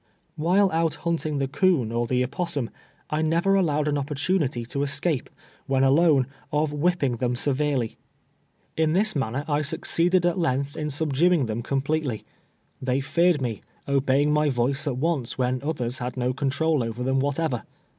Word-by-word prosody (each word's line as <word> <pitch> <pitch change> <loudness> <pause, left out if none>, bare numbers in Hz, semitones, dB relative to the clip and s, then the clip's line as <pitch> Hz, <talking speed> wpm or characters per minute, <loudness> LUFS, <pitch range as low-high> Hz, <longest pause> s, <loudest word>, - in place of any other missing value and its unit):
While 185 +5 +3
out 165 0 +1
hunting 160 -3 -1
the 135 -1 0
coon 145 - +2
or 120 0 -1
the 125 +1 +1
opossum, 140 -2 -3 0.4
I 150 +1 0
never 170 +5 +2
allowed 150 -6 +2
an 145 -1 +1
opportunity 145 -3 -1
to 140 +4 -3
escape, 145 0 -1 0.4
when 135 0 +2
alone, 140 0 +4 0.3
of 150 0 0
whipping 150 -5 +1
them 125 +1 0
severely. 135 -3 -1 0.8
In 160 -1 +2
this 210 +3 +2
man 120 -6 -1
ner 140 +3 -3
I 150 -1 +1
succeeded 175 +4 +1
at 175 +1 +1
length 140 -2 0
in 150 -1 -3
subduing 155 +2 +2
them 110 +1 -3
com 135 +3 -1
pletely. 145 -7 -1 0.6
They 130 0 0
feared 170 +1 +2
me, 115 -5 -3 0.3
obeying 140 +1 +2
my 150 0 +3
voice 135 +3 0
at 130 -3 -1
once 145 -4 -1
when 125 0 0
others 130 -5 -3
had 125 +1 -4
no 125 0 0
control 140 +1 +1
over 115 +2 -4
them 130 +1 +1
whatever. 140 -2 -1
145 Hz, 165 wpm, -25 LUFS, 130-160 Hz, 0.8 s, alone